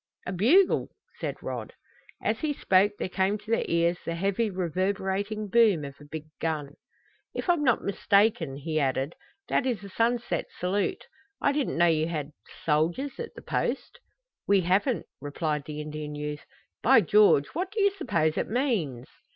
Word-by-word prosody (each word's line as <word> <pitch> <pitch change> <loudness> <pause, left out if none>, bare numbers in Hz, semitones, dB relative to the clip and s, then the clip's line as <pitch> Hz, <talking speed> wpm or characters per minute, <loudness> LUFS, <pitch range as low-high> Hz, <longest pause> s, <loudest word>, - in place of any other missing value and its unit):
"A - - -3
bugle!" 260 - +4 0.3
said - - -3
Rod. - - -5 0.5
As - - 0
he 305 -2 0
spoke 200 -5 +3
there - - -2
came 190 +2 0
to 215 +2 -10
their 230 - +2
ears 170 +1 +2
the 165 - -3
heavy, 200 +5 0
reverberating 195 +3 -1
boom 205 -8 +4
of 140 - -7
a - - -12
big 155 +1 -7
gun. 150 -3 -2 0.6
"If - - -3
I'm 345 -4 +3
not 250 -5 +3
mistaken," 200 -7 +2
he 155 +3 -2
added, 135 +2 0 0.3
"that 265 - +1
is 230 -6 -1
a 200 - -8
sunset 235 +4 0
salute. 190 +3 -1 0.3
I 280 - +2
didn't 285 - -1
know 170 - +5
you 160 -2 +2
had 155 -3 -4 0.3
soldiers 165 - 0
at 470 - -6
the - - -11
Post!" - - -2 0.5
"We 200 -1 +5
haven't," 195 +8 +1 0.2
replied 150 0 -2
the 150 -1 -6
Indian 150 0 -6
youth. 150 0 -5 0.4
"By 255 -1 +6
George, 200 -6 +5
what 360 +4 -2
do 435 +2 -4
you 400 0 +4
suppose 200 - 0
it - - -2
means?" 205 - -1
190 Hz, 165 wpm, -27 LUFS, 155-230 Hz, 0.6 s, By